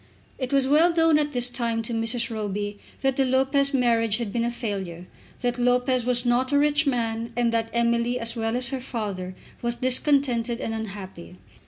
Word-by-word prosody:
It 255 -1 -3
was 275 -1 +3
well 315 +5 +5
known 325 -2 +4
at 295 0 -1
this 245 -3 +1
time 235 -2 -1
to 235 - -4
Mrs. 230 +1 -1
Roby 205 -1 -3 0.2
that 270 -1 +1
the 270 - +4
Lopez 270 +2 +2
marriage 230 -5 +2
had 230 -4 -4
been 235 - 0
a 235 - 0
failure, 195 -8 -5 0.4
that 245 -1 -1
Lopez 250 0 +2
was 245 0 0
not 245 +2 +2
a 285 - +4
rich 295 +1 +2
man, 230 -2 -1
and 235 -1 +2
that 225 0 0
Emily, 235 +1 +1
as 230 +1 -1
well 225 0 -1
as 250 -1 0
her 265 -1 -4
father, 200 -7 -4 0.3
was 240 0 -1
discontented 255 -2 +1
and 225 - -3
unhappy. 195 -5 -7
240 Hz, 190 wpm, -25 LUFS, 225-260 Hz, 0.4 s, well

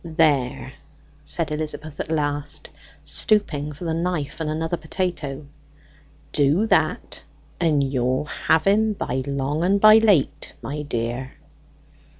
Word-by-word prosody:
"There," 155 -6 +1 0.5
said - - -1
Elizabeth 155 0 -4
at - - -4
length, 145 -2 -2 0.3
stooping 155 -9 0
for 150 - -10
the 165 - -1
knife 165 -4 -2
and 160 -1 -2
another 160 +2 -1
potato, 160 -4 -3 0.9
"do 150 +8 +3
that, 225 - 0 0.4
and 155 -5 +2
you'll 130 +2 0
have 160 +1 +1
him 215 +2 +3
by 130 -9 -2
long 140 +3 -1
and 195 +3 +3
by 215 +1 +8
late, 205 -10 +2
my 150 +2 -4
dear." 120 -1 -3
155 Hz, 125 wpm, -23 LUFS, 140-175 Hz, 0.9 s, by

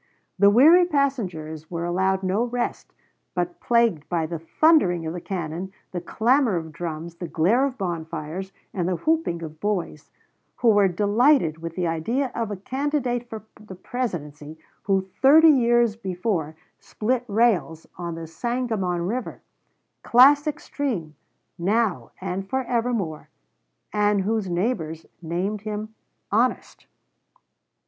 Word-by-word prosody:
The 200 +1 +7
weary 315 - +7
passengers 185 - -2
were 170 -1 -3
allowed 190 +2 0
no 190 +5 +1
rest, 245 0 -3 0.4
but 175 -1 -2
plagued 235 -10 +1
by 170 -2 0
the 165 0 -5
thundering 180 - +3
of 160 - -3
the 175 - -6
cannon, 175 0 -4 0.2
the 175 - -4
clamor 235 +4 +2
of 160 -2 -4
drums, 165 +1 -6
the 175 - -5
glare 205 +14 +2
of 265 -1 -7
bonfires, 170 0 -4 0.2
and 180 -3 -1
the 185 - 0
whooping 310 - 0
of 155 -1 -8
boys, 185 -7 -3 0.5
who 235 - +2
were 205 -2 +5
delighted 205 - +2
with 165 0 -6
the 180 - -1
idea 230 - -1
of 230 -2 -2
a 205 - -3
candidate 255 +1 -2
for 220 -1 -7 0.2
the 195 -3 -10
Presidency 160 - -5 0.3
who 195 -1 +1
thirty 310 +4 +8
years 240 -4 +3
before 180 -6 -3 0.2
split 245 +3 -2
rails 205 -7 +1
on 170 -2 -5
the 165 0 -6
Sangamon 205 -2 -2
River 235 +7 -4 0.6
classic 285 +5 +5
stream 220 - -3 0.5
now 190 - 0
and 190 +1 -4
for 265 +3 0
evermore 230 -10 -2 0.6
and 210 -1 +2
whose 210 -1 -1
neighbors 175 -4 -2 0.2
named 180 +5 -2
him 215 +1 -5 0.4
'honest.'" 235 +5 0
195 Hz, 135 wpm, -24 LUFS, 170-240 Hz, 0.6 s, thirty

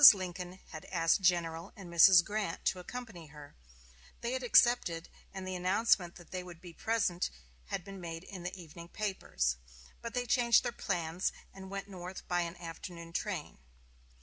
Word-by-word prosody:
Lincoln 180 -1 -5 0.2
had 155 - -8
asked 165 +1 +2
General 170 -1 +1
and 195 -3 -10
Mrs. 170 +1 +8
Grant 205 -5 -3
to 185 - +2
accompany 205 -4 -7
her; 150 -1 -12 0.7
they 235 0 -1
had 260 - -1
accepted, 240 -9 +4 0.2
and 190 -1 -6
the 185 - -3
announcement 185 -1 +2
that 175 - -14
they 185 - -3
would 175 -2 -10
be 175 -1 -11
present 185 -4 0 0.4
had 115 - -3
been 195 0 -9
made 165 0 -6
in 190 -1 -8
the 180 +2 -5
evening 170 0 -10
papers; 170 - -1 0.4
but 235 +1 -6
they 245 0 0
changed 240 -2 +5
their 240 - -1
plans, 175 -4 -1 0.2
and 190 0 -9
went 195 0 -5
north 185 -1 -8
by 175 -1 +2
an 170 0 -3
afternoon 170 0 -8
train. 180 - -3
180 Hz, 170 wpm, -33 LUFS, 170-200 Hz, 0.7 s, Mrs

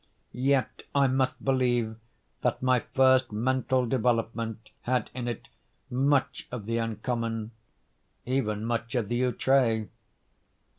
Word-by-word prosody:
Yet 135 +1 +1
I 140 -1 +5
must 130 0 0
believe 120 -4 +2 0.5
that - - 0
my 130 -1 +4
first 130 -1 +3
mental 130 +3 +1
development 115 -2 -1
had 125 0 0
in 125 -1 -4
it 120 -2 -4 0.4
much 135 +2 +1
of 120 -5 -5
the 115 +1 0
uncommon—even 115 0 -4
much 115 +1 -2
of 115 -5 0
the 120 +1 0
outré. 125 -3 +2
120 Hz, 110 wpm, -28 LUFS, 115-130 Hz, 0.5 s, I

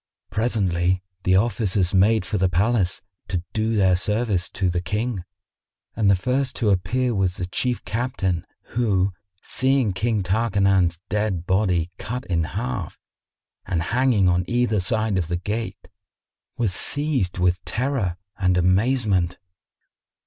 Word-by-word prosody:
Presently, 95 -5 +1 0.2
the 95 - +4
Officers 100 -3 +1
made 100 +1 +4
for 105 - -2
the 95 0 +3
palace, 95 +1 +1 0.2
to 90 -3 -2
do 110 +1 0
their 95 -3 +4
service 105 0 0
to 95 - -1
the 90 0 0
King, 105 +2 -2 0.7
and 105 -2 +2
the 100 - +6
first 125 +7 -1
to 105 -3 +1
appear 120 +7 +1
was 95 -3 0
the 90 - -2
Chief 120 +7 -2
Captain 100 -8 -1 0.3
who, 100 -5 +2 0.3
seeing 130 -5 +2
King 110 +1 0
Tarkanan's 95 -3 +2
dead 105 -5 -1
body 90 -3 +1
cut 125 +3 -4
in 85 -3 0
half 105 0 -4 0.7
and 85 - 0
hanging 120 -6 +3
on 90 0 +2
either 120 -3 +1
side 110 +1 0
of 85 - -2
the 85 +1 -1
gate, 105 +4 -4 0.7
was 110 -6 0
seized 140 - 0
with 90 0 +1
terror 115 -9 -1 0.2
and 90 -2 +2
amazement. 95 -1 +2
100 Hz, 135 wpm, -23 LUFS, 90-115 Hz, 0.7 s, the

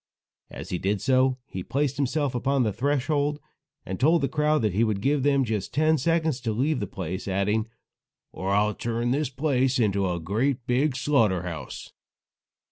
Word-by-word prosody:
As - - -9
he 90 - -1
did 100 +1 0
so, 130 +1 +2
he 95 - -6
placed 140 +6 -1
himself 145 0 0
upon 130 +2 +1
the 110 -3 0
threshold, 145 - 0 0.5
and 95 - -5
told 160 +3 +3
the - - +3
crowd 150 -2 +1
that 105 -4 +1
he 110 +5 +2
would 110 -3 0
give 140 +6 +1
them 140 0 +3
just 110 -1 -3
ten 155 +1 +3
seconds 160 -2 0
to 115 -2 -1
leave 135 +5 0
the - - -3
place, 95 -6 -5
adding: 105 +3 0 0.6
"Or 95 - -4
I'll 105 +2 +2
turn 120 +2 -2
this 145 0 0
place 130 -1 +1
into 100 -5 +1
a 85 -1 -2
great 115 - -1
big 130 +3 +1
slaughter 115 - +2
house." 80 -7 -7
125 Hz, 180 wpm, -26 LUFS, 105-145 Hz, 0.6 s, told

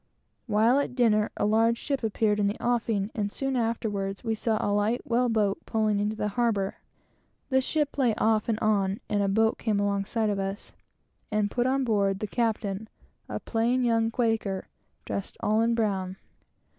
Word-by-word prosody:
While 225 +5 +4
at 280 - -2
dinner, 215 -4 +3
a - - +1
large 225 +2 +3
ship 275 +2 -2
appeared 215 -1 +1
in 205 - +2
the 205 - -2
offing, 225 -4 0
and 205 -2 -2
soon 270 +2 -2
afterwards 210 -4 -2
we 225 -2 0
saw 220 0 0
a 205 - 0
light 210 +4 0
whale 245 +1 +2
boat 210 -3 +1
pulling 215 -2 +1
into 210 +1 -1
the 210 -1 -1
harbor. 210 -3 0 0.7
The 265 -1 +3
ship 295 +2 -1
lay 240 -5 +3
off 220 0 +1
and 220 - +1
on, 200 -2 +1
and 205 -1 +1
a 200 - +1
boat 220 +3 +2
came 215 -3 0
alongside 205 +2 0
of 200 - -2
us, 195 +1 -4 0.6
and 210 -1 0
put 245 0 +1
on 270 +1 +1
board 200 -5 +1
the 215 - -3
captain, 215 -2 -2 0.4
a - - -3
plain 240 +3 0
young 225 -1 +2
Quaker, 225 -5 -1 0.4
dressed 200 - -4
all 215 +1 +2
in 230 0 +2
brown. 195 -5 -1
220 Hz, 180 wpm, -27 LUFS, 205-235 Hz, 0.7 s, While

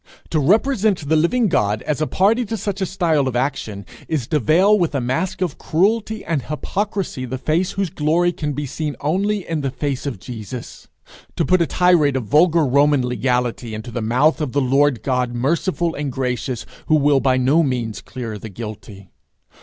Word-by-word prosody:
To 160 - +2
represent 205 - +2
the 160 - +4
living 210 +10 +2
God 105 - 0
as 150 0 -2
a 155 - +1
party 220 +6 +2
to 225 +2 -3
such 200 -2 -4
a 190 - 0
style 165 -7 +1
of 130 - -3
action, 115 -6 -2 0.2
is 150 -7 -1
to 150 - +2
veil 185 - +4
with 170 -4 0
a - - +1
mask 155 +10 -2
of 175 -6 -2
cruelty 215 +5 0
and 160 -5 -1
hypocrisy 190 - -3
the 130 +1 -4
face 165 +7 0
whose 195 -4 -2
glory 165 +4 +1
can 150 -4 -3
be 145 +2 -3
seen 150 +2 -4
only 195 +6 0
in 165 -2 -2
the 135 - -1
face 140 +1 -3
of 135 - -3
Jesus; 120 +2 -8 0.5
to - - 0
put 185 -1 +3
a 170 - +2
tirade 175 -6 +3
of 130 - -1
vulgar 160 - +4
Roman 140 0 +3
legality 125 -1 -1
into 110 +3 -7
the 120 - -3
mouth 125 +9 +2
of 145 -5 -2
the 145 - +2
Lord 135 -1 +2
God 125 -2 0
merciful 170 +6 0
and 145 -2 -3
gracious, 125 -1 -3 0.2
who 155 - +4
will 145 -2 +4
by 130 -1 +2
no 135 +6 +3
means 125 -7 -2
clear 115 -5 -6
the 110 - -8
guilty. 105 -3 -9
145 Hz, 195 wpm, -20 LUFS, 125-175 Hz, 0.5 s, the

